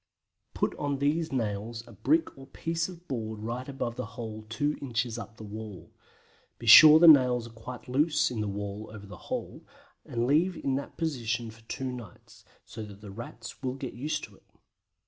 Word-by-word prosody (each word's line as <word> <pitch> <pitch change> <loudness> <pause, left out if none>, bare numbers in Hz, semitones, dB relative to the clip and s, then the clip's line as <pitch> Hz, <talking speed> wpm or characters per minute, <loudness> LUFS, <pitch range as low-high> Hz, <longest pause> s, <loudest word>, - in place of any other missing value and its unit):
Put - - 0
on 145 -1 -1
these 150 +4 0
nails 115 -1 -2
a - - -12
brick 325 +1 +1
or 135 0 -12
piece 165 +1 -2
of 175 -1 -12
board 110 -4 -4
right 120 +4 -4
above 120 -3 -4
the 125 - -3
hole 110 -2 -6
2 145 +7 -1
inches 120 -3 -2
up 115 +1 -9
the 110 - -9
wall. 105 -2 -8 0.7
Be - - -10
sure 155 0 +11
the 170 +1 +7
nails 125 -6 +7
are 115 - -10
quite 120 +3 -9
loose 150 +4 +2
in 115 -3 -2
the 105 - -1
wall 100 +1 -5
over 105 -2 -10
the 100 -2 -10
hole, - - -4 0.4
and 120 0 -2
leave 165 +7 +2
in 135 - -1
that 140 +1 -4
position 120 -7 -2
for 115 +1 -17
two 130 -1 -3
nights, 120 -7 -11 0.2
so 115 - -8
that 100 -1 -11
the 105 -2 -9
Rats 115 +4 -9
will 130 -1 -2
get 135 -2 -6
used 145 +6 -3
to - - -10
it. - - -24
120 Hz, 195 wpm, -29 LUFS, 110-140 Hz, 0.7 s, sure